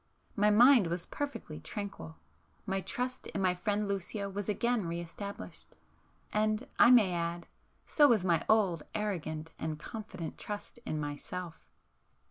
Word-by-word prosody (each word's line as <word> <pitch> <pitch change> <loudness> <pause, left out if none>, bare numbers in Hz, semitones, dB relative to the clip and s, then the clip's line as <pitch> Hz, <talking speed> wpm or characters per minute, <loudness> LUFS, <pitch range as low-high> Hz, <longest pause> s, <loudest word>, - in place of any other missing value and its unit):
My 210 +1 +4
mind 235 -1 +7
was 170 +1 -3
perfectly 280 - -5
tranquil,—my 80 - -7
trust 250 +5 -3
in - - -4
my 185 -1 +3
friend 205 +3 -1
Lucio 200 +1 -3
was 205 +1 -4
again 235 -2 +1
re 170 +1 -2
established,—and 210 +4 -5
I - - +8
may 220 -7 +6
add, 170 0 -2 0.4
so 295 -2 +5
was 220 -8 +3
my 170 -3 +3
old 195 -7 +3
arrogant 160 -6 -3
and 160 -1 -3
confident 190 -1 -7
trust 210 +3 -6
in 155 - -1
myself. 160 +4 -6
195 Hz, 130 wpm, -32 LUFS, 170-215 Hz, 0.4 s, I